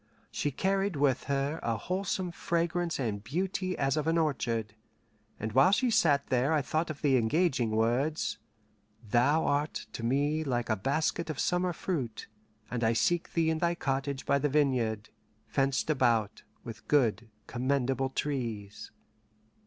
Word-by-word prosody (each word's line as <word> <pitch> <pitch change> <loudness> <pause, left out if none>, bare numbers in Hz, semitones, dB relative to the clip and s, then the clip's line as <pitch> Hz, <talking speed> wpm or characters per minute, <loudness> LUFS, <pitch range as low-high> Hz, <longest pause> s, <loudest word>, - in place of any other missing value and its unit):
She 145 - -1
carried 195 +5 0
with 140 -3 +1
her 140 +3 -1
a 115 -1 -1
wholesome 185 - -2
fragrance 170 0 -1
and 105 -6 -2
beauty 185 - -2
as 135 0 +1
of 155 0 -1
an 165 +1 +2
orchard, 120 -9 -1 0.7
and 110 +1 -3
while 135 - +5
she 245 +4 +2
sat 145 -9 +3
there 130 +4 +2
I 150 -3 +2
thought 155 +4 -1
of 155 -1 -7
the 135 -3 +4
engaging 130 0 +1
words: 120 +8 0 0.7
"Thou 135 +9 +3
art 145 +2 -1
to 115 - -6
me 145 +6 +1
like 120 -5 -1
a - - +3
basket 155 - -1
of 155 - -3
summer 180 0 +1
fruit, 145 - -3 0.5
and 120 -1 -2
I 110 +1 +3
seek 170 +9 0
thee 165 -1 +2
in 160 - -1
thy 170 0 +1
cottage 135 -2 -2
by 140 - +2
the 150 +2 +1
vineyard, 125 -7 +1 0.4
fenced 135 -1 0
about 115 -7 +1 0.2
with 115 -2 -9
good 115 -6 +2 0.2
commendable 135 +1 0
trees." 115 -8 -4
140 Hz, 155 wpm, -30 LUFS, 120-160 Hz, 0.7 s, while